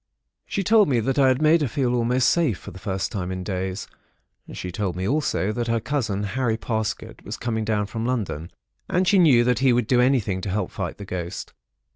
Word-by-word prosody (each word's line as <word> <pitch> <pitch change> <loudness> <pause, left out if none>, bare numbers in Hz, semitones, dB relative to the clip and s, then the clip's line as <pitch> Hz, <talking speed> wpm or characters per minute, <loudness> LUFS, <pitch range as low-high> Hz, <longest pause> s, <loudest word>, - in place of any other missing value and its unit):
She 195 - -1
told 215 +2 +5
me 125 -4 +2
that 135 +5 0
I 135 - +6
had 130 +3 +2
made 160 +2 +5
her 145 - +1
feel 125 +1 0
almost 125 +1 +2
safe, 155 - +2
for 100 - -10
the 95 - -11
first 95 -1 -3
time 95 -5 -3
for 95 - -3
days. 95 +1 -4 0.6
She 90 - -6
told 95 -2 -2
me 95 +1 -2
also 135 -7 0
that 120 +2 -2
her 115 0 +1
cousin, 110 -6 -2
Harry 115 +2 -1
Parsket, 110 -1 -3
was - - -6
coming 110 -2 -2
down 105 -1 0
from 110 +2 -5
London, 100 -10 -2 0.4
and 180 +1 +1
she 195 +1 +5
knew 135 -9 +6
that 125 -2 +2
he 130 -1 +4
would 120 -1 +2
do 125 +2 +3
anything 120 -8 +1
to 100 - -4
help 95 -1 -2
fight - - -4
the 100 - -8
ghost. 90 -2 -5
115 Hz, 220 wpm, -24 LUFS, 100-130 Hz, 0.6 s, I